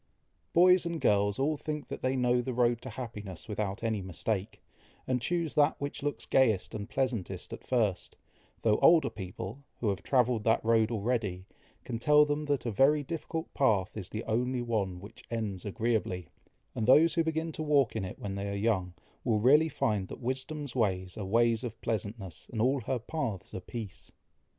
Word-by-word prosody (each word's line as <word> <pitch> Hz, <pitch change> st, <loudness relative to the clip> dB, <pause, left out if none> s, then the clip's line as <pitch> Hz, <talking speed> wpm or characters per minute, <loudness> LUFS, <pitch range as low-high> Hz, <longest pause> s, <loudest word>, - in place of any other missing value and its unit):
Boys 180 Hz, +1 st, +6 dB
and 170 Hz, -1 st, -3 dB
girls 100 Hz, -3 st, +2 dB
all 150 Hz, +3 st, +1 dB
think 150 Hz, 0 st, -5 dB
they 130 Hz, +1 st, -1 dB
know 125 Hz, -1 st, +2 dB
the 125 Hz, 0 st, -4 dB
road 120 Hz, -1 st, +2 dB
to 130 Hz, -, -7 dB
happiness 110 Hz, -5 st, -7 dB
without 105 Hz, 0 st, -3 dB
any 110 Hz, -3 st, 0 dB
mistake, 95 Hz, +2 st, -3 dB, 0.5 s
and 125 Hz, -1 st, 0 dB
choose 170 Hz, +4 st, -1 dB
that 150 Hz, +1 st, +3 dB
which 140 Hz, 0 st, -4 dB
looks 145 Hz, 0 st, -3 dB
gayest 115 Hz, -8 st, +2 dB
and 105 Hz, 0 st, -5 dB
pleasantest 130 Hz, -7 st, -2 dB
at -, -, -8 dB
first, 110 Hz, -8 st, -1 dB, 0.5 s
though 110 Hz, -2 st, +3 dB
older 165 Hz, -1 st, +5 dB
people, 95 Hz, +5 st, -7 dB, 0.2 s
who 110 Hz, -, 0 dB
have 100 Hz, -1 st, -2 dB
travelled 125 Hz, -4 st, +2 dB
that 110 Hz, 0 st, +2 dB
road 115 Hz, -1 st, +4 dB
already, 105 Hz, -5 st, -1 dB, 0.4 s
can 115 Hz, -3 st, -4 dB
tell 150 Hz, +4 st, +6 dB
them 150 Hz, +1 st, -1 dB
that 145 Hz, -4 st, -1 dB
a 115 Hz, -, 0 dB
very 140 Hz, +7 st, +4 dB
difficult 165 Hz, +2 st, -5 dB
path 105 Hz, -9 st, +2 dB
is 95 Hz, -4 st, -6 dB
the 110 Hz, -, -4 dB
only 125 Hz, +2 st, 0 dB
one 100 Hz, -6 st, -1 dB
which 100 Hz, +3 st, -12 dB
ends 110 Hz, -5 st, -3 dB
agreeably; 105 Hz, -5 st, -1 dB, 0.5 s
and 110 Hz, -, -2 dB
those 160 Hz, +6 st, +6 dB
who 165 Hz, -, +2 dB
begin 160 Hz, 0 st, -1 dB
to 155 Hz, -, -6 dB
walk 145 Hz, -6 st, +2 dB
in 110 Hz, -, -1 dB
it 95 Hz, -, -6 dB
when 100 Hz, -1 st, -5 dB
they 100 Hz, +1 st, -3 dB
are 100 Hz, -, -3 dB
young, 100 Hz, -4 st, 0 dB, 0.3 s
will 110 Hz, -2 st, +2 dB
really 150 Hz, +8 st, +5 dB
find 105 Hz, -9 st, 0 dB
that -, -, -8 dB
"wisdom's 130 Hz, +3 st, -4 dB
ways 95 Hz, -6 st, 0 dB
are 105 Hz, -, -5 dB
ways 115 Hz, +3 st, +2 dB
of 115 Hz, -2 st, -6 dB
pleasantness, 105 Hz, -4 st, -4 dB
and 115 Hz, -, -4 dB
all 130 Hz, +4 st, +2 dB
her 130 Hz, +3 st, -1 dB
paths 115 Hz, -, -4 dB
are -, -, -3 dB
peace." 110 Hz, 0 st, -8 dB
115 Hz, 185 wpm, -30 LUFS, 105-135 Hz, 0.5 s, Boys